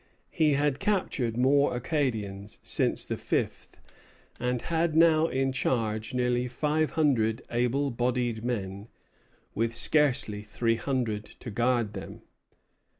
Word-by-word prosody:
He 155 -2 +2
had 145 0 +1
captured 135 - -1
more 140 +1 +3
Acadians 110 -8 -3
since - - +1
the - - -3
fifth; - - -3 0.6
and 125 0 -1
had 165 -1 0
now 160 -1 +5
in 135 -1 0
charge 115 -2 -1
nearly 125 0 +1
five 150 +5 0
hundred 115 -8 +2
able 125 +4 0
bodied 120 -1 -1
men, 100 -4 -4 0.7
with 115 +1 -1
scarcely 130 -10 +4
three 115 +2 -1
hundred 115 -6 -2
to 120 - -10
guard 120 -1 0
them. 95 - -9
125 Hz, 120 wpm, -28 LUFS, 110-145 Hz, 0.7 s, now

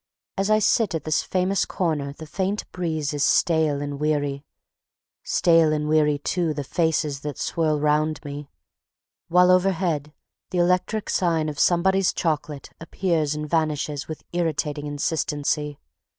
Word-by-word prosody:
As 195 +1 -1
I 215 - +5
sit 215 -2 +2
at 160 - -3
this 155 - +1
famous 185 +1 0
corner 155 -6 -2
the 160 +3 -10
faint 195 +6 -2
breeze 160 -5 -2
is 145 -1 0
stale 155 -4 +2
and 145 -1 -5
weary; 145 -2 -1 0.8
stale 165 -2 +3
and 150 0 -1
weary 150 -1 +3
too 160 +2 -1
the 145 - -3
faces 155 -2 0
that 145 0 -6
swirl 155 -3 0
around 150 +1 +1
me; 145 0 -7 0.8
while 180 +1 +5
overhead 180 -5 +1 0.4
the 180 - -3
electric 180 +5 +1
sign 165 -4 +1
of 145 - -7
Somebody's 190 +2 +3
Chocolate 150 -4 -3
appears 165 -3 -1
and 150 0 -4
vanishes 150 -2 -1
with 155 - -7
irritating 150 -3 -1
insistency. 145 0 -1
155 Hz, 140 wpm, -24 LUFS, 150-175 Hz, 0.8 s, I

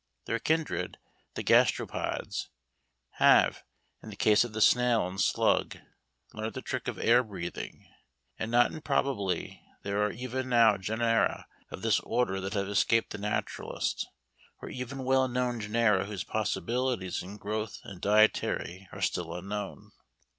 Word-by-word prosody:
Their 115 - -1
kindred, 160 +3 -1 0.4
the - - -3
Gastropods, - - +1 0.7
have, - - +5 0.4
in - - -10
the 105 - -8
case 105 +2 +4
of 120 - -6
the 110 - -4
snail 120 -1 +4
and 95 +1 -3
slug, - - +2 0.6
learnt 110 +1 -5
the 130 - -5
trick 130 - -4
of - - -3
air 120 +2 +5
breathing. 100 -7 -7 0.5
And 110 - -2
not 120 +1 +4
improbably 135 -10 -1 0.2
there 100 +1 -1
are 105 - +1
even 130 +2 -4
now 115 -4 +5
genera 115 +4 0 0.2
of - - -8
this - - +3
order 95 -6 -1
that 95 +3 -4
have 100 -1 0
escaped 110 +3 +2
the 105 - -5
naturalist, 105 +1 -2 0.5
or - - -8
even 130 +2 -5
well 130 0 +3
known 125 -1 -1
genera 105 -2 +2
whose 100 -2 -4
possibilities 120 -3 -1
in 95 +3 -9
growth 105 +1 -4
and 95 -3 -10
dietary 100 -3 +2
are - - -9
still - - -1
unknown. 100 +3 -6
110 Hz, 145 wpm, -29 LUFS, 100-125 Hz, 0.7 s, have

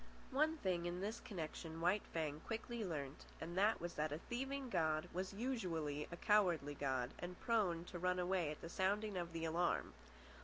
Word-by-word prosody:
One 310 +4 +3
thing, 180 - 0
in 175 +1 -2
this 210 +4 -2
connection, 165 -6 -5
White 180 +5 +4
Fang 155 -2 -1
quickly 230 +3 -3
learnt, 150 -6 -3
and 170 +2 -4
that 205 +4 +4
was 175 +1 -3
that 150 0 0
a 150 - -1
thieving 265 +8 -3
god 155 -7 +2
was 185 +1 -1
usually 180 - -1
a 170 - -5
cowardly 175 -10 +4
god 130 -3 0
and 175 0 -5
prone 190 -8 +2
to 180 - -6
run 180 +1 +2
away 180 -2 +2
at 150 - -5
the - - -5
sounding 200 +3 +1
of 175 -1 -2
the 165 0 -2
alarm. 170 +2 +1
175 Hz, 185 wpm, -41 LUFS, 160-210 Hz, -, White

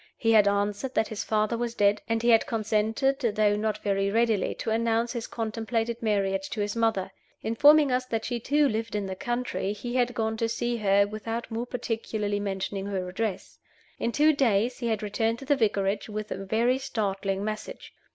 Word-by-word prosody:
He 225 - +2
had 210 -2 +6
answered 205 +6 -1
that 220 - +1
his 215 -1 -4
father 215 +1 +1
was 235 -1 -2
dead; 205 -1 +3
and 225 0 0
he 240 - +3
had 225 -1 +5
consented, 220 +5 0
though 215 -4 +2
not 215 0 -1
very 195 -1 +1
readily, 225 -2 +1
to 225 - -3
announce 230 +1 +1
his 235 -2 -4
contemplated 225 +1 -2
marriage 195 -3 0
to 220 - -5
his 205 +1 -1
mother. 225 -5 0 0.3
Informing 290 +5 +5
us 250 0 0
that 225 -2 -2
she 240 -1 -2
too 290 +5 +2
lived 225 -2 -2
in 205 -1 -1
the 190 -1 -4
country, 240 -2 -2
he 240 +4 -6
had 245 -1 +1
gone 220 -1 -1
to 230 0 0
see 240 +1 -1
her, 200 -2 +3
without 225 +3 -5
more 230 +2 -3
particularly 220 -4 -2
mentioning 195 0 -3
her 190 -2 -3
address. 205 +1 -4 0.4
In 235 - 0
two 305 +4 +4
days 240 -3 +1
he 240 - -2
had 220 -2 -1
returned 225 +2 0
to 270 - -10
the 285 - +3
Vicarage 205 -4 0
with 215 0 -5
a 195 - -4
very 235 +6 +2
startling 195 -5 -2
message. 215 0 -6
220 Hz, 195 wpm, -27 LUFS, 205-235 Hz, 0.4 s, had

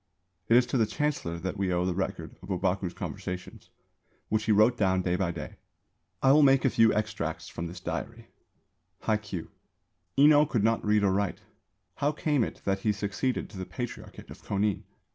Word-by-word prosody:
It 115 - +7
is 125 - +5
to 125 - -1
the 110 - +3
Chancellor 125 - -2
that 95 +4 -4
we 95 -1 0
owe 90 0 +1
the 90 - 0
record 95 +1 -4
of - - -12
Ōbaku's - - -1
conversations, 90 0 -6 0.6
which 110 0 0
he 110 - +2
wrote 110 +4 +5
down 95 -4 +1
day 90 0 +1
by 95 -1 0
day. 85 - -7 0.7
I 135 - +6
will 150 +2 +6
make 135 -1 +5
a 135 - +3
few 115 -1 +5
extracts 110 +1 -2
from 85 - -5
this 90 +2 -8
diary: 80 -5 -5 0.8
Hai 110 - +1
Kyū. 100 -6 -7 0.7
Enō 150 +1 +6
could 110 -5 +1
not 115 +1 +2
read 105 0 +2
or 100 - +3
write. 100 -1 -1 0.6
How 145 +1 +1
came 150 -3 +1
it - - -5
that 95 0 +1
he 105 +2 +1
succeeded 105 +5 -2
to 100 - -9
the 95 - -4
Patriarchate 120 +5 -7
of - - -11
Kōnin? 100 0 0
105 Hz, 190 wpm, -28 LUFS, 95-120 Hz, 0.8 s, It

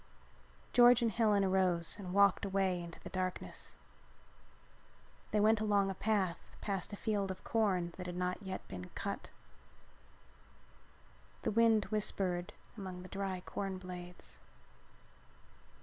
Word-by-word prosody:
George 245 0 +7
and 230 - +2
Helen 210 -2 +3
arose 185 -3 +2
and 185 -3 -6
walked 200 0 +4
away 190 -2 +1
into 170 -1 -9
the - - -9
darkness. 185 -1 -4 1.5
They 210 - +1
went 215 +1 +4
along 200 -2 +2
a - - -3
path 190 -4 -1
past 195 -2 -3
a - - -4
field 205 -2 -1
of 190 0 -6
corn 185 -7 +1
that 180 -1 -5
had 175 - -4
not 180 +2 -1
yet 190 -2 -6
been 90 -1 -7
cut. - - -4 2.1
The - - +1
wind 225 -1 +4
whispered 185 -4 0 0.2
among 185 -4 -6
the 185 - -10
dry 195 -2 -3
corn 195 +1 -4
blades. 180 -1 -9
190 Hz, 130 wpm, -35 LUFS, 180-210 Hz, 2.1 s, George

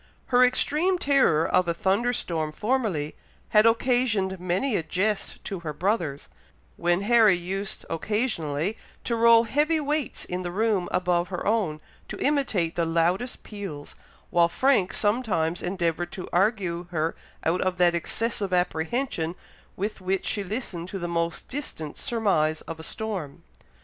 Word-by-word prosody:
Her 250 +1 +7
extreme 305 +8 +2
terror 275 - +3
of 185 -1 +2
a 170 - 0
thunder 210 +6 +1
storm 160 -9 -2
formerly, 210 - -1 0.3
had 215 +1 +6
occasioned 225 -5 +2
many 185 +8 0
a - - +1
jest 195 +6 -2
to 195 -3 -4
her 160 -3 -5
brothers, 170 -4 -1 0.5
when 175 +2 +1
Harry 220 -2 +5
used, 190 +3 -4
occasionally, 185 - -1 0.2
to 235 - -1
roll 230 0 +6
heavy 295 +7 +1
weights 295 -2 -2
in 180 +1 -3
the 175 - -3
room 200 -1 0
above 180 -1 +1
her 180 -2 -5
own, 200 -8 0 0.3
to - - -6
imitate 245 - +1
the 170 - +1
loudest 170 +8 0
peals, 195 -9 -7 0.4
while 170 -1 +4
Frank 250 -5 +2
sometimes 205 -7 0
endeavoured 175 -2 -1
to 185 - -6
argue 180 -3 +1
her 165 -1 -1 0.3
out 170 +3 +1
of 185 -1 0
that 175 -1 +4
excessive 200 +3 -2
apprehension 180 +1 0 0.4
with 205 +1 -3
which 190 +1 -1
she 205 - 0
listened 185 -4 -5
to 195 - -4
the 175 -2 -3
most 170 -1 -2
distant 160 - -5
surmise 195 - +1
of 165 0 -8
a - - -8
storm. 195 -9 -5
190 Hz, 150 wpm, -26 LUFS, 170-230 Hz, 0.5 s, Her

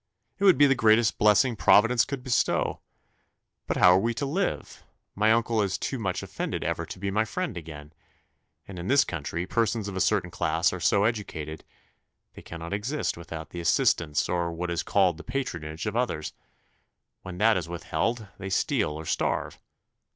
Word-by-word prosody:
It 200 - +1
would 190 - +6
be 145 - +7
the 135 - +4
greatest 110 -2 +3
blessing 105 +4 +4
Providence 115 +3 +4
could 135 -3 -5
bestow. 125 -3 0 0.9
But - - -1
how 90 - +7
are 90 - +5
we 115 +3 -1
to 140 - -2
live? 180 +8 -3 0.3
My 110 +2 +3
uncle 115 -1 +2
is 100 -2 -1
too 135 - -3
much 95 -5 -2
offended - - -4
ever - - -2
to - - -8
be 100 +1 -3
my 105 +3 +2
friend 180 - -4
again; 75 -3 -9 0.7
and 95 -3 -8
in 85 - -6
this 140 +4 +5
country, 80 +2 -4
persons 115 0 0
of 100 - -6
a 95 - -1
certain 95 -5 +1
class 85 0 +1
are 90 - -4
so 100 +4 +2
educated, 85 -9 -3 0.7
they - - -12
cannot 85 +2 -7
exist 120 +9 -2
without 80 -2 -8
the 85 - -6
assistance, 80 -1 +2
or 85 -1 -1
what 85 +1 -4
is 85 - -1
called 95 -5 +2
the 85 - -10
patronage, 85 - -4
of 105 0 -3
others: 120 -11 -2 0.9
when 90 -1 -8
that 110 +3 +4
is 85 -2 -3
withheld, 110 +6 -2
they 95 0 -5
steal 105 - 0
or 80 +1 -7
starve. - - -2
100 Hz, 180 wpm, -26 LUFS, 85-115 Hz, 0.9 s, be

